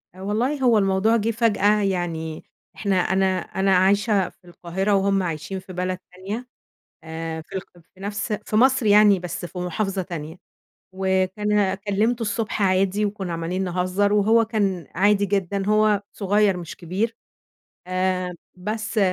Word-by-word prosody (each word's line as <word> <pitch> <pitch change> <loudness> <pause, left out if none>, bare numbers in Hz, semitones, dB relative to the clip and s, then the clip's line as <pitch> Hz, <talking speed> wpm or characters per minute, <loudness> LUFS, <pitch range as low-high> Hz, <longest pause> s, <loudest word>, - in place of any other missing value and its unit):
والله 225 +9 -1
هو 240 -3 +5
الموضوع 195 +2 +3
جه 225 +2 0
فجأة 210 -2 +2
يعني 170 -5 -2 0.3
إحنا 200 -2 0
أنا 190 +2 +2
أنا 190 0 0
عايشة 200 +1 +3
في - - -27
القاهرة، 180 +4 -2
وهُم 195 0 +2
عايشين 170 +3 -4
في 185 0 -11
بلد 185 +1 -2 0.2
تانية، 200 +7 -6 0.6
آآ 160 0 -5
في 160 - -12
الق 190 - -5 0.2
في 190 - -22
نفس 205 +2 -3
في - - -3
مصر 260 +1 +4
يعني 205 -1 +6
بس 180 +1 -5
في 175 +1 -7
محافظة 190 +2 -2
تانية، 165 -2 -7 0.6
وكان 190 +1 +1
كلِّمته 210 +4 0
الصبح 220 0 -2
عادي 195 +2 +2
وكنا 195 -4 -4
عمّالين 170 +3 -2
نهزر 185 +3 0
وهو 220 +3 +4
كان 200 - -1
عادي 200 +2 +3
جدًا، 195 0 -1
هو 215 -1 +3
صغير 205 -1 +2
مش 170 -2 -7
كبير، 195 +7 -2 0.7
آآ 185 0 -1 0.2
بس 215 +4 -3
195 Hz, 145 wpm, -23 LUFS, 185-210 Hz, 0.7 s, يعني